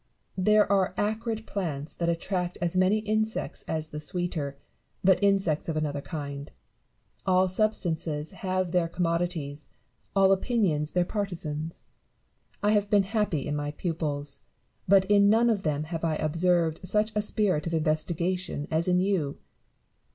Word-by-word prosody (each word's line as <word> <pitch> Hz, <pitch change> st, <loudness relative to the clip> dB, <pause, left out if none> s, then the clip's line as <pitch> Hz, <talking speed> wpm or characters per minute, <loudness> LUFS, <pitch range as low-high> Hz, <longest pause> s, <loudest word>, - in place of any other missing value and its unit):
There 210 Hz, +2 st, +5 dB
are 190 Hz, -2 st, +2 dB
acrid 220 Hz, +1 st, -1 dB
plants 160 Hz, -7 st, -3 dB
that 170 Hz, 0 st, -1 dB
attract 180 Hz, +1 st, -2 dB
as 175 Hz, +1 st, -1 dB
many 185 Hz, +3 st, +4 dB
insects 215 Hz, +1 st, -1 dB
as 155 Hz, -1 st, -2 dB
the 150 Hz, -, -6 dB
sweeter, 155 Hz, -4 st, -3 dB, 0.5 s
but 190 Hz, +1 st, +4 dB
insects 195 Hz, -6 st, +2 dB
of 155 Hz, -, -1 dB
another 145 Hz, -2 st, -1 dB
kind. 140 Hz, -3 st, -6 dB, 0.8 s
All 185 Hz, 0 st, +4 dB
substances 170 Hz, -6 st, -1 dB
have 185 Hz, -3 st, -2 dB
their 175 Hz, -2 st, +2 dB
com 175 Hz, +1 st, -1 dB
modities, 165 Hz, -4 st, -2 dB, 0.5 s
all 195 Hz, -1 st, +5 dB
opinions 190 Hz, -7 st, +1 dB
their 180 Hz, +1 st, +1 dB
partisans. 165 Hz, -6 st, -4 dB, 0.8 s
I 210 Hz, -, +4 dB
have 205 Hz, -1 st, +2 dB
been 205 Hz, -2 st, +4 dB
happy 200 Hz, -, -1 dB
in 150 Hz, -, -2 dB
my 145 Hz, 0 st, -2 dB
pupils; 145 Hz, -4 st, -3 dB, 0.5 s
but 190 Hz, 0 st, +6 dB
in 200 Hz, 0 st, +5 dB
none 230 Hz, +2 st, +4 dB
of 205 Hz, -3 st, 0 dB
them 150 Hz, -3 st, -1 dB
have 165 Hz, +1 st, -5 dB
1 160 Hz, -2 st, 0 dB
observed 165 Hz, 0 st, +2 dB
such 210 Hz, +4 st, +1 dB
a 210 Hz, -, +1 dB
spirit 200 Hz, -7 st, +1 dB
of 165 Hz, -, -3 dB
investigation 165 Hz, +1 st, -1 dB
as 160 Hz, +2 st, +1 dB
in 180 Hz, 0 st, +3 dB
you. 180 Hz, -7 st, 0 dB
175 Hz, 150 wpm, -27 LUFS, 155-200 Hz, 0.8 s, but